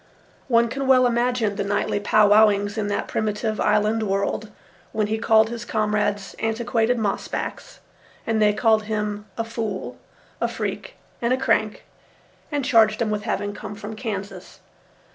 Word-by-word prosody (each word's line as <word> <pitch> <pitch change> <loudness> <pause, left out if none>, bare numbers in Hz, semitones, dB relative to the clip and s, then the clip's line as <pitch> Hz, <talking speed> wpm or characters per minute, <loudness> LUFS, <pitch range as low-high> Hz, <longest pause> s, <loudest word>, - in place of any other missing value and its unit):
One 235 -2 +4
can 270 +3 -3
well 255 -1 +6
imagine 240 -3 +1
the 200 - 0
nightly 205 0 0
pow 210 0 +4
wow 215 +1 +7
ings 205 0 -2
in 215 -2 -2
that 205 - -2
primitive 215 0 -2
island 210 +1 +2
world, 200 +1 -1 0.4
when 215 - +1
he 220 +1 -2
called 220 0 +4
his 235 0 -5
comrades 210 -3 -1
antiquated 230 +1 0
moss 210 -3 -1
backs, - - -6 0.4
and 220 -1 0
they 210 0 +5
called 215 0 +2
him 210 -1 -3
a 230 - 0
fool, 225 -4 -5 0.4
a - - +2
freak, - - -5 0.3
and 235 +1 0
a - - +1
crank, 220 -4 0 0.7
and 290 -3 -1
charged 220 -5 +4
him 225 -3 0
with 210 0 -3
having 205 0 -2
come 205 0 -8
from 215 +1 -7
Kansas. 205 -3 -6
215 Hz, 160 wpm, -23 LUFS, 210-230 Hz, 0.7 s, wow